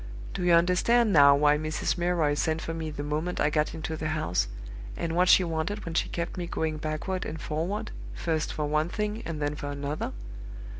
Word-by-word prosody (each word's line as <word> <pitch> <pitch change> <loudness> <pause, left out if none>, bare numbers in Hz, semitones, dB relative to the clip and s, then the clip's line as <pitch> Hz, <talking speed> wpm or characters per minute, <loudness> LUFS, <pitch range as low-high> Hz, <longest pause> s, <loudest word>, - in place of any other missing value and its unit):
Do 190 - -3
you 175 -1 +4
understand 190 +7 +4
now 140 -2 +8
why 150 +1 +4
Mrs. 155 0 -1
Milroy 175 -4 +1
sent 160 +2 0
for 165 - -4
me 160 -1 -4
the 145 -1 -5
moment 155 +4 -2
I 150 - +2
got 150 +1 0
into 160 0 -4
the 155 0 -3
house, 155 - 0 0.5
and 165 -1 -2
what 180 +1 +4
she 185 - +7
wanted 170 +5 -2
when 165 - -4
she - - 0
kept 170 +1 -4
me 175 -1 -3
going 160 -2 -2
backward 155 +5 -3
and 160 - -5
forward, 165 +8 -3 0.2
first 160 -2 -1
for 150 - -2
one 155 +2 +1
thing 210 +2 -2
and 165 -2 -4
then 145 0 -1
for 145 - -6
another? 145 +1 -3
160 Hz, 205 wpm, -28 LUFS, 150-175 Hz, 0.5 s, now